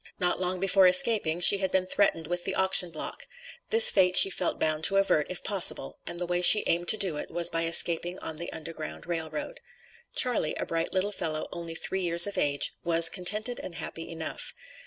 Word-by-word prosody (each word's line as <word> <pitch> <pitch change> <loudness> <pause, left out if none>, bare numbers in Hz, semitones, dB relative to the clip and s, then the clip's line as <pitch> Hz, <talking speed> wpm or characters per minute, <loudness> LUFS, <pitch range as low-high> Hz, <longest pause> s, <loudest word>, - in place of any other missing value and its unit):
Not 180 -1 -2
long 180 0 -4
before 195 0 +3
escaping, 190 -6 +3
she 200 +2 +8
had 190 -1 -3
been 185 -1 -1
threatened 185 -4 -1
with 175 +2 -5
the - - -5
auction 190 -1 +3
block; 155 -2 -8 0.4
this 460 +2 +5
fate 180 -2 +1
she 195 - +7
felt 180 - -4
bound 155 0 -2
to 195 - +2
avert, 195 -6 0
if 180 - -7
possible, 195 -4 0
and 175 - -7
the 175 - 0
way 175 0 -3
she 210 +4 +7
aimed 175 +1 -2
to 220 - +5
do 185 -8 -1
it - - -8
was 170 0 +2
by 165 0 -2
escaping 170 +2 +2
on 160 - -9
the 170 - -6
Underground 155 - -10
Rail 165 -2 -5
Road. 155 - -8 0.6
Charley, 245 -11 +1
a - - -6
bright 165 0 -4
little 195 +2 -2
fellow 155 -5 -5
only 170 -1 -9
three 190 +3 -3
years 170 -1 +4
of 205 - -6
age, 145 -1 -1
was 165 -1 +2
"contented 210 +6 -1
and 175 - -10
happy" 165 0 -9
enough. 160 -1 -8
175 Hz, 210 wpm, -25 LUFS, 165-190 Hz, 0.6 s, she